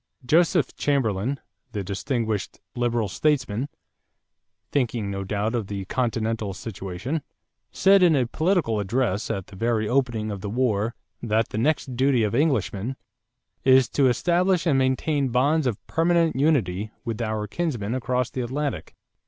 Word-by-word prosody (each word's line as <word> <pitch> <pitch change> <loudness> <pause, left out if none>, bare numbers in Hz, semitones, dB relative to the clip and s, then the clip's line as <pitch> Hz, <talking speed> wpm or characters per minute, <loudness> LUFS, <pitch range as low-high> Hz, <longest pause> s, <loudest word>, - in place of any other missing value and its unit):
Joseph 165 - +3
Chamberlain, 130 -2 0 0.3
the 105 -2 -2
distinguished 110 +1 -2 0.2
Liberal 120 -2 0
statesman, 130 +1 0 1.0
thinking 120 -7 0
no 100 0 -3
doubt 105 +3 -1
of 115 -5 -2
the 100 -1 -4
continental 110 -3 -1
situation, 100 - -4 0.5
said 195 0 +5
in 175 -4 +5
a 130 -3 +2
political 155 - +1
address 105 0 0
at 95 -2 -2
the 100 - -14
very 115 +1 0
opening 120 -4 0
of 100 -2 -5
the 100 - -4
war 115 -1 0 0.3
that 110 -1 +1
the 110 - -3
next 135 -1 0
duty 130 -2 +3
of 105 - 0
Englishmen 125 - 0 0.7
"is 130 -1 +6
to 140 -2 +3
establish 175 +7 +2
and 145 -5 +3
maintain 135 +2 +1
bonds 140 +5 +2
of 115 -5 -1
permanent 165 0 +2
unity 110 - +1 0.2
with 115 -1 -3
our 110 -2 -1
kinsmen 120 -4 -2
across 125 -1 -1
the 130 - -3
Atlantic.... 140 +4 -3
120 Hz, 145 wpm, -24 LUFS, 105-140 Hz, 1.0 s, is